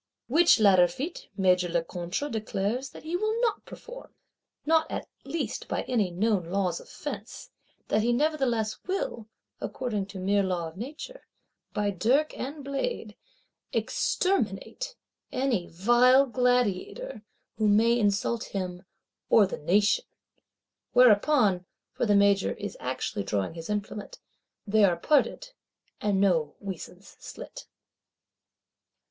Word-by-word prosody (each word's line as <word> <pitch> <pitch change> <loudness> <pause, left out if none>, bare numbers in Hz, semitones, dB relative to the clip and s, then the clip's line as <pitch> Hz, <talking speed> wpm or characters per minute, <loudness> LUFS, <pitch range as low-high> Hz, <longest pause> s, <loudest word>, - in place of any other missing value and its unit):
Which 320 +1 +5
latter 190 -4 +6
feat 275 - -6
Major 180 -2 +3
Lecointre 175 - -2
declares 220 +3 -2
that - - -12
he 320 +3 -3
will 435 +4 0
not 455 -4 0
perform, - - -11 0.5
not 320 +1 +3
at - - -4 0.2
least 330 - -3
by - - -2
any 220 -7 0
known 190 +1 0
laws 180 -2 0
of - - -15
fence; - - -7 0.4
that 215 - +2
he 235 +2 +2
nevertheless 245 -6 0
will, 370 - -3 0.3
according 215 -6 -3
to 200 -1 -9
mere 200 +2 +2
law 180 -3 -1
of 160 - -11
Nature, 300 - -8 0.4
by 205 -1 0
dirk 245 - +1
and 285 +3 -6
blade, 280 - -3 0.6
"exterminate" 380 - -1 0.4
any 250 -9 0
"vile 240 +9 +5
gladiator," 250 - 0 0.4
who 215 - +3
may 230 +3 +4
insult 210 +2 +1
him 180 -2 -4 0.5
or 215 - +6
the 190 - -5
Nation;—whereupon 210 - +1 0.3
(for 240 - -1
the 205 - +4
Major 200 -1 +4
is 205 - -6
actually 130 -4 -3
drawing 100 +5 -2
his 165 +2 -8
implement) 210 0 -4 0.5
"they 215 0 +3
are 180 -4 +4
parted," 300 - +1 0.5
and 205 -2 +1
no 165 -7 +2
weasands 190 0 -8
slit. - - -10
215 Hz, 125 wpm, -28 LUFS, 190-270 Hz, 0.6 s, latter